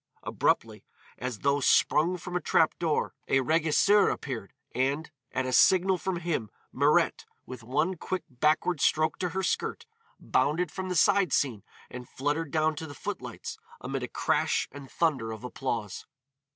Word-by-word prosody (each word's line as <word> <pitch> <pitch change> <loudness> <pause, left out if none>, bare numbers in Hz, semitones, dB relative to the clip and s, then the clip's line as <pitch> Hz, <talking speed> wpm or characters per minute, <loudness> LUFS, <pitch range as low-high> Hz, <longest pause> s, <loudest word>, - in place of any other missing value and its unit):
Abruptly, - - 0 0.4
as 125 -4 -5
though 140 0 +2
sprung 155 +5 +3
from 180 +1 -7
a 180 - 0
trap 160 - +3
door, 165 -3 0
a 135 - +3
régisseur 165 +8 +3
appeared, 115 -8 -5 0.2
and 140 +5 -1 0.2
at 130 0 -1
a 130 - -2
signal 185 +6 +5
from 190 -2 -2
him 155 -11 -2 0.2
Mirette, - - +2 0.2
with 130 -2 -9
one 140 +10 0
quick 185 +3 -3
backward 155 +4 +1
stroke 155 +1 +2
to 180 - -1
her 190 +3 -3
skirt, - - -2 0.3
bounded 160 +3 0
from 190 -1 -5
the 180 - -2
side 195 +2 +4
scene 120 -8 +1 0.3
and 125 -1 -8
fluttered 145 +3 -2
down 155 +1 +1
to 160 - -5
the 145 - -10
footlights - - -6 0.2
amid - - -4
a - - -3
crash - - 0
and 140 -1 -10
thunder 135 -10 0
of 110 +1 -8
applause. 120 -5 -4
155 Hz, 160 wpm, -28 LUFS, 130-175 Hz, 0.4 s, signal